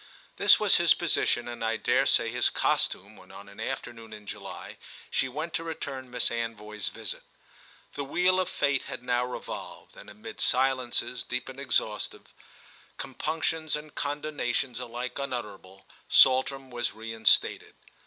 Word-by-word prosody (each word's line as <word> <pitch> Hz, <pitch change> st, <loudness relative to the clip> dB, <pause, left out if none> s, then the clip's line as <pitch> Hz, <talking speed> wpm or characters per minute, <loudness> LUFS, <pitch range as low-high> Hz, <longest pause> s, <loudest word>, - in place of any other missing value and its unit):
This -, -, +7 dB
was -, -, +5 dB
his -, -, +5 dB
position 120 Hz, -, +1 dB
and 120 Hz, -1 st, -5 dB
I 115 Hz, 0 st, +1 dB
dare -, -, +3 dB
say -, -, +3 dB
his -, -, +3 dB
costume -, -, 0 dB
when -, -, -15 dB
on 100 Hz, -, -11 dB
an 100 Hz, -, -13 dB
afternoon 115 Hz, -4 st, -5 dB
in 105 Hz, -1 st, -10 dB
July 100 Hz, -2 st, -8 dB, 0.3 s
she 130 Hz, -, +1 dB
went 155 Hz, +6 st, -4 dB
to 165 Hz, -, -1 dB
return 140 Hz, -5 st, -5 dB
Miss 125 Hz, -1 st, -1 dB
Anvoy's 105 Hz, -3 st, -3 dB
visit. -, -, -5 dB, 0.7 s
The 145 Hz, -, -3 dB
wheel 180 Hz, +6 st, +3 dB
of 185 Hz, -, 0 dB
fate 140 Hz, -2 st, +1 dB
had -, -, -7 dB
now 125 Hz, 0 st, +2 dB
revolved, 125 Hz, 0 st, -7 dB
and -, -, -12 dB
amid 105 Hz, +2 st, -8 dB
silences 130 Hz, -1 st, +1 dB
deep 125 Hz, -, -3 dB
and 130 Hz, +1 st, -9 dB
exhaustive, 110 Hz, -5 st, -2 dB, 0.6 s
compunctions 155 Hz, +3 st, -2 dB
and 150 Hz, 0 st, -7 dB
condonations 145 Hz, -4 st, -2 dB
alike 125 Hz, +1 st, -5 dB
unutterable, 105 Hz, -8 st, -5 dB, 0.2 s
Saltram 130 Hz, 0 st, +5 dB
was 120 Hz, -4 st, -2 dB
reinstated. 110 Hz, -1 st, +1 dB
125 Hz, 145 wpm, -29 LUFS, 115-140 Hz, 0.7 s, This